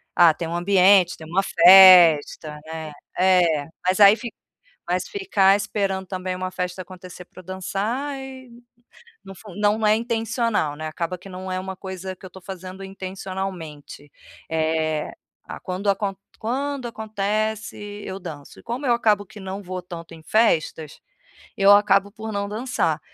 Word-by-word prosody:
ah, 170 -2 +6
tem 165 +1 -5
um 170 - -3
ambiente, 185 0 +4
tem 160 - -11
uma 185 +4 +1
festa, 170 -5 +7
né? 160 -1 -7 0.3
É, 175 -5 +3 0.2
mas 185 +2 +2
aí 200 +1 +8
fic 235 0 -8 0.5
mas - - -2
ficar 375 - +2
esperando 195 -2 -2
também 185 -1 -4
uma 185 0 -4
festa 180 0 -4
acontecer 180 -1 -12
pra 185 - -15
dançar 210 +10 -3
e 260 -1 -10 0.7
não 195 - -10
fun 205 -1 -13
não 210 +1 +2
é 210 - +5
intencional, 230 - -1
né? 155 +1 -6
Acaba 170 +3 -4
que 195 - -13
não 185 0 -7
é 185 - -2
uma 190 0 -7
coisa 190 0 -7
que - - -19
eu 185 - -11
tô 190 - -13
fazendo 185 0 -9
intencionalmente. 185 -6 -7 0.4
Eh, 160 -1 -1 0.3
a - - -8
quando 190 +2 -2
acon 195 0 -1 0.2
quando 265 +2 -3
acontece 215 0 -3 0.3
eu 190 - -5
danço. 155 -6 -10
E - - -20
como 250 +4 -5
eu 240 - +4
acabo 210 -3 +1
que 210 - -14
não 190 +1 -6
vou 185 0 -6
tanto 170 -1 -10
em 160 - -14
festas, 160 -6 0 0.6
eu 195 0 +6
acabo 205 -1 +4
por 220 +1 -7
não 200 -1 -2
dançar. 210 - -2
190 Hz, 160 wpm, -23 LUFS, 175-210 Hz, 0.7 s, aí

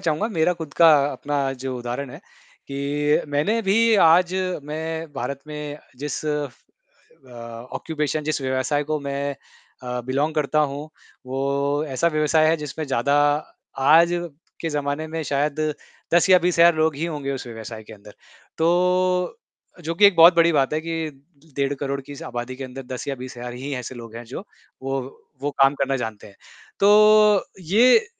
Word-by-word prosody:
चाहूँगा, 170 +4 0
मेरा 175 -4 +1
खुद 160 -4 -7
का 165 -1 +7 0.2
अपना 140 -2 -2
जो 130 -1 -3
उदाहरण 125 +2 -5
है, - - -10 0.5
कि 145 +2 0
मैंने 155 +11 +1
भी 225 +4 +3
आज 175 +3 +5 0.3
मैं 160 +1 -5
भारत 135 +3 -4
में 150 -1 -6 0.2
जिस 150 +1 -4
अ, 150 -2 -1 1.2
ऑक्यूपेशन 155 -1 -2
जिस 155 -2 -1
व्यवसाय 130 +3 0
को 155 +1 -1
मैं 140 0 -3 0.5
अ, 125 0 -4
बिलोंग 145 +4 0
करता 150 0 0
हूँ, 145 +2 -7 0.4
वो 140 +3 -1
ऐसा 135 +5 +1
व्यवसाय 155 +1 +3
है 165 - +3
जिसमें 150 +1 -5
ज़्यादा 135 +1 +1 0.6
आज 160 +5 +5 0.5
के 165 - -2
ज़माने 145 +1 -2
में 160 0 -4
शायद 145 +1 -1 0.5
10 175 +2 +4
या 185 - +8
20 175 0 0
हज़ार 170 0 +7
लोग 155 -2 +1
ही 160 - -2
होंगे 145 -4 -4
उस 130 -2 -6
व्यवसाय 115 -1 -8
के 110 - -13
अंदर। 105 -1 -14 0.4
तो 180 - +2 0.5
जो 165 - -2
कि 205 +4 +7
एक 200 - +3
बहुत 165 +2 +8
बड़ी 170 0 +5
बात 140 -3 +2
है, 155 - 0
कि 165 -1 -3 0.5
डेढ़ 140 0 0
करोड़ 140 0 -2
की 140 +1 -11
इस 145 - -9
आबादी 120 -2 -5
के 135 - -6
अंदर 130 +1 -8
10 125 - -6
या 140 - -1
20 125 0 -9
हज़ार 120 0 -6
ही 135 +3 -6
ऐसे 125 0 -6
लोग 115 -2 -10
हैं 120 - -8
जो, 130 - -8 0.4
वो 135 0 -2 0.4
वो 145 - 0
काम 135 +1 +5
करना 135 -1 0
जानते 110 -4 -6
हैं। 100 - -16 0.4
तो 210 0 +6 0.2
ये 240 - +4
150 Hz, 170 wpm, -23 LUFS, 135-165 Hz, 1.2 s, या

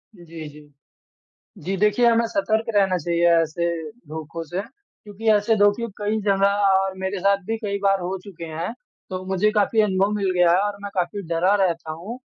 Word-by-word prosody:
जी, 165 -3 -10
जी। 150 0 -15 1.0
जी, 190 +3 -1
देखिए, 210 +4 +3
हमें 230 0 +4
सतर्क 220 0 0
रहना 190 -2 +3
चाहिए 170 +1 +1
ऐसे 165 +1 -1 0.4
धोखों 160 +2 -6
से, 175 +4 -4
क्योंकि 225 - -9
ऐसे 210 +2 +3
धोखे 205 +3 +3
कई 210 +1 -1
जगह 200 0 +2
और 190 0 +2
मेरे 190 +1 -3
साथ 200 +1 +2
भी 225 - -1
कई 200 -2 -3
बार 195 -1 +3
हो 180 +2 -3
चुके 185 -5 -9
हैं। 165 +5 -4 0.4
तो 185 0 -4
मुझे 190 +3 +2
काफ़ी 215 +1 +2
अनुभव 195 -1 +1
मिल 195 -2 0
गया 180 -1 +4
है 175 - +4
और 205 0 -2
मैं 200 - -5
काफ़ी 185 +2 -2
डरा 170 +4 +2
रहता 165 -3 -2
हूँ 190 +10 -7
195 Hz, 185 wpm, -23 LUFS, 175-205 Hz, 1.0 s, हमें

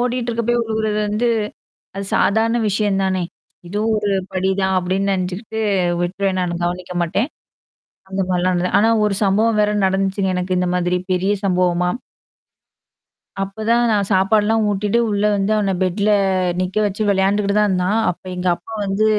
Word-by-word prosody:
ஓடிட்ருக்கப்ப 240 -1 -1
விழுகுறது 220 -1 -1
வந்து 220 +4 0 0.7
அது 195 - -3
சாதாரண 225 +3 +2
விஷயம் 200 -1 0
தானே, 190 -1 0 0.5
இதுவும் 215 +4 0
ஒரு 205 -1 0 0.2
படி 190 0 0
தான் 190 0 +1
அப்படின்னு 190 +2 -1
நெனச்சுகிட்டு 190 +4 -3 0.4
விட்ருவேன் 185 +2 -1
நானு 175 -1 -2
கவனிக்க 180 +1 -3
மாட்டேன். 200 - 0 0.8
அந்த 195 0 -1
மாதிரிலாம் 180 0 +1 0.2
ஆனா 225 +2 +4
ஒரு 210 -1 +1
சம்பவம் 215 +3 +2
வேற 210 0 +2 0.2
நடந்துச்சுங்க 190 0 0
எனக்கு 180 0 -1
இந்த 180 - 0
மாதிரி 180 0 +1 0.2
பெரிய 190 +2 +1
சம்பவமா 180 -1 +1 1.5
அப்பதான் 220 +4 0
நான் 200 -2 +1
சாப்பாடுலாம் 210 +3 +3
ஊட்டிட்டு 205 +3 0
உள்ள 205 0 0
வந்து 200 +1 0
அவன 200 -2 +1
பெட்ல 200 +3 0 0.5
நிக்க 185 +2 -3
வெச்சு 205 +2 -3
விளையாண்டுகிட்டு 200 +1 +1
தான் 210 - +3
இருந்தான், 185 +3 +1
அப்ப 175 - -8
எங்க 180 0 -1
அப்பா 175 +6 -13
வந்து 195 +2 0
195 Hz, 145 wpm, -19 LUFS, 185-215 Hz, 1.5 s, ஆனா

